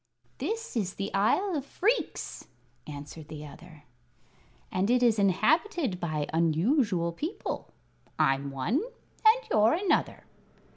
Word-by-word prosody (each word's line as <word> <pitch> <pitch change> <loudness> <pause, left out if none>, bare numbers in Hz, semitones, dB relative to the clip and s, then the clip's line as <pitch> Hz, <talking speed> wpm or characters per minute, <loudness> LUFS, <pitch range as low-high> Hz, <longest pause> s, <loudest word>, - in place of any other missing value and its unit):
"This 455 - -3
is 195 -5 -1
the 200 +1 -4
Isle 340 - +2
of 285 - -2
Phreex," 430 - -1 0.4
answered 150 +1 -8
the 150 -1 -8
other, 155 +1 -13 0.9
"and 185 +3 0
it 245 0 +3
is 225 -3 +4
inhabited 250 - +2
by 155 -4 -1
unusual 170 - +2
people. 315 - -5 0.5
I'm 135 +1 +2
one, 140 - 0 0.4
and 440 +3 +7
you're 215 +1 +5
another." 385 +2 0
200 Hz, 115 wpm, -29 LUFS, -, 0.9 s, and